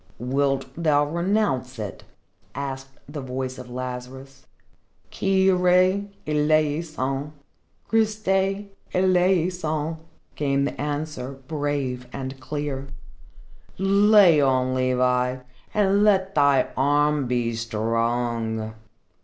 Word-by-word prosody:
"Wilt 135 +2 0
thou 150 -3 +2
renounce 170 - 0
it?" 105 -3 -6 0.5
asked 135 -1 -6
the 145 0 -6
voice 130 0 -4
of 125 -1 -9
Lazarus. 130 +2 -7 0.6
"Kyrie 190 0 +3 0.2
eleison, 150 -2 0 0.5
Christie 205 -2 0 0.2
eleison!" 180 -4 +1 0.4
came 140 -1 +1
the - - -4
answer, 145 -3 -3
brave 145 -5 -2
and 135 0 -6
clear. 140 0 -4 0.9
"Lay 195 -4 +5
on, 130 -2 +2
Levi, 125 0 +1 0.4
and 200 -1 +3
let 195 -2 +3
thy 140 -3 +3
arm 145 +1 +2
be 120 -1 0
strong!" 115 0 -1
145 Hz, 85 wpm, -24 LUFS, 130-180 Hz, 0.9 s, Lay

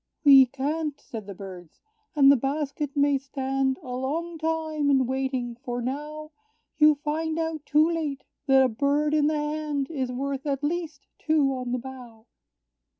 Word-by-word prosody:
"We 270 -3 +8
can't!" 290 +3 -3
said 220 -4 -9
the 200 - -7
birds, 180 -4 -10 0.4
"and 275 -2 +7
the - - +6
basket 285 +2 -3
may 285 -1 +3
stand 270 -1 -1
A 250 -1 -5
long 320 +6 -3
time 315 -2 -1
in 265 -2 +4
waiting; 260 -2 -2
for 245 -1 -5
now 300 +5 -5 0.5
You 305 0 +7
find 315 +2 -2
out 320 -2 -3
too 305 +1 +4
late, 310 -5 -3 0.2
that 270 -1 +6
a - - +4
bird 285 +5 0
in 300 -1 +3
the 310 0 +1
hand 295 -1 -2
Is 260 -5 -2
worth, 275 +2 -3
at 280 0 -2
least, 315 -2 -3
two 300 -4 +2
on 250 -1 -4
the 250 - 0
bough. 245 -3 -10
280 Hz, 165 wpm, -26 LUFS, 265-305 Hz, 0.5 s, We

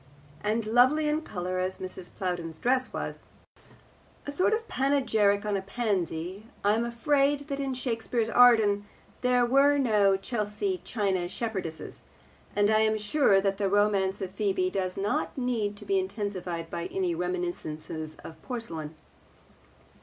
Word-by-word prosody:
And 215 +2 0
lovely 255 +7 +4
in 300 +1 +1
colour 185 - -4
as 185 +1 -2
Mrs. 185 -1 -7
Plowden's 175 -4 -3
dress 255 +4 +1
was, - - -4 1.0
a 285 - -4
sort 365 +8 +2
of 450 +1 -1
panegyric 220 - +2
on 210 -1 0
a 195 - -1
pansy, 195 -2 -2 0.2
I 205 +1 +4
am 225 +2 +1
afraid 280 +4 +2
that 275 0 -2
in 270 -2 -2
Shakespeare's 230 -2 -1
Arden 220 -4 +5 0.3
there 250 -1 +3
were 275 +3 +4
no 210 -7 +3
Chelsea 235 - -2
China 190 -5 -1
Shepherdesses, 190 -8 -5 0.5
and 205 +1 +3
I 215 - +4
am 220 0 +2
sure 210 -1 +3
that 195 0 0
the 200 -1 +1
romance 200 -1 +2
of 190 -1 -4
Phebe 190 -2 0
does 185 -1 -2
not 200 +6 -1
need 230 -5 -1
to - - -11
be 390 0 +2
intensified 185 - -4
by 170 0 -3
any 185 -3 -1
reminiscences 165 -3 -4
of 160 -1 -11
porcelain. 165 - -5
205 Hz, 145 wpm, -28 LUFS, 185-245 Hz, 1.0 s, Arden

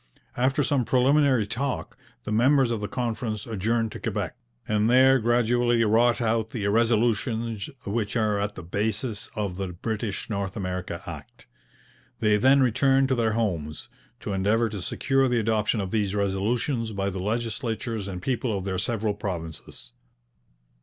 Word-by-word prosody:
After 130 +4 +2
some 135 -2 +1
preliminary 130 -1 +3
talk, 125 +5 -3 0.3
the - - -5
members 130 +3 +4
of 115 -3 -2
the 105 - -2
conference 115 -2 -3
adjourned 115 +1 -1
to - - -7
Quebec, - - -3 0.3
and 105 +1 +2
there 130 +2 +6
gradually 120 0 +2
wrought 115 +2 +3
out 110 -1 0
the 110 -4 -4
resolutions 115 0 +1 0.2
which 105 +1 -2
are 105 -3 +1
at 100 0 -2
the - - -8
basis 105 +5 -2
of 100 -4 -3
the 95 -1 -2
British 105 +3 -4
North 100 -3 -3
America 90 -2 -4
Act. - - -10 0.7
They 105 -2 +3
then 135 +5 +5
returned 135 +2 +3
to 130 - +2
their 115 -2 +1
homes, 85 -10 -2 0.3
to 100 - -3
endeavour 105 +4 +2
to 100 -2 -5
secure 135 +7 +1
the 125 -2 +1
adoption 110 0 +1
of 95 -2 -3
these 105 -2 0
resolutions 110 +4 -1
by 100 0 -1
the 95 - -5
legislatures 115 0 -2
and 90 -2 -6
people 120 -4 -1
of 95 - -5
their 95 -2 -2
several 110 0 -1
provinces. 80 -10 -6
110 Hz, 155 wpm, -26 LUFS, 100-120 Hz, 0.7 s, there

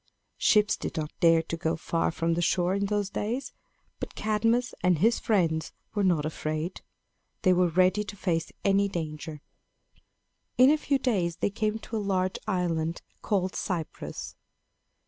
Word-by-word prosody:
Ships 210 -1 +4
did - - -5
not 155 -1 -2
dare 165 -1 +5
to 165 - -4
go 165 0 -1
far 165 +1 0
from 165 +1 0
the 170 - 0
shore 175 +1 +2
in 200 0 0
those 205 -1 -1
days. 240 +7 -3 0.5
But - - -6
Cadmus 225 +3 +1
and 180 -2 +3
his 225 +8 +3
friends 165 -7 +1 0.2
were 205 -1 0
not 170 -6 +2
afraid. 155 +2 -3 0.6
They 185 -2 +5
were 180 0 +3
ready 185 +4 +3
to 205 - -7
face 165 -5 -1
any 200 0 +4
danger. 155 -3 -5 1.2
In 255 +3 +7
a 310 - +4
few 280 -2 +1
days 195 -11 0
they 200 - -1
came 215 +1 -1
to 225 0 -5
a - - 0
large 190 -2 0
island 170 -4 -1 0.2
called 190 -3 0
Cyprus. 170 -4 -4
185 Hz, 160 wpm, -28 LUFS, 165-210 Hz, 1.2 s, In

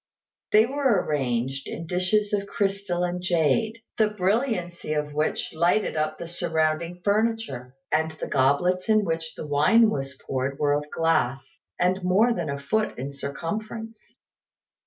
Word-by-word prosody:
They 215 +1 +6
were 260 -6 +1
arranged 135 -1 -1
in 165 - -6
dishes 185 +5 +1
of 200 -1 0
crystal 195 -3 -1
and 180 0 -2
jade, 180 +6 +1 0.2
the 215 - +5
brilliancy 195 - -1
of 150 -1 -2
which 150 +1 -1
lighted 170 +6 +2
up 155 0 -1
the 170 - -6
surrounding 170 0 -1
furniture; 205 - -1 0.2
and 160 +1 +2
the - - -3
goblets 150 +9 +1
in 215 -1 +4
which 165 -1 -2
the - - -6
wine 215 +11 +4
was 135 -3 -4
poured 135 +1 -2
were 145 -1 +2
of 150 +1 -2
glass, 140 -6 0 0.2
and 185 +2 +2
more 205 +7 +4
than 175 -7 -3
a 140 - -2
foot 215 +11 -1
in 135 +3 -4
circumference. 215 +11 -6
175 Hz, 150 wpm, -25 LUFS, 145-210 Hz, 0.2 s, They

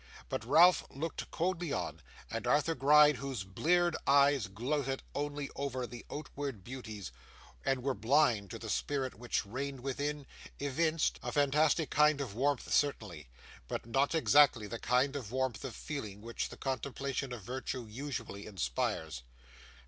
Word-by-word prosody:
But - - -2
Ralph 165 +9 +6
looked 155 +4 -5
coldly 175 -2 -1
on; - - -3 0.3
and 115 +1 -3
Arthur 150 +5 +3
Gride, 150 0 +6
whose 130 -5 -4
bleared 170 - +2
eyes 140 -4 +5
gloated 135 +6 -2
only 145 0 -3
over 130 -3 -2
the 120 0 -10
outward 140 -7 -5
beauties, 110 - -7 0.5
and 135 -2 0
were 135 0 +1
blind 115 -3 +2
to - - -6
the - - -8
spirit 135 -3 -1
which 120 -2 -2
reigned 135 +5 -4
within, 145 +2 -3 0.3
evinced 155 +3 +1
a - - -4
fantastic 150 +2 +2
kind 150 0 +4
of 130 -8 -4
warmth 140 +3 0
certainly, 100 - 0 0.4
but - - -4
not 135 +7 +1
exactly 145 -7 +5
that 115 +3 -6
kind 130 +3 +2
of 120 -7 -5
warmth 130 -3 -1
of 135 -4 -5
feeling 110 -10 -5
which 115 +1 -4
the - - -10
contemplation 135 0 -3
of 120 -4 -6
virtue 125 +2 -4
usually 115 -3 -6
inspires. 80 - -2
135 Hz, 150 wpm, -33 LUFS, 115-145 Hz, 0.5 s, Ralph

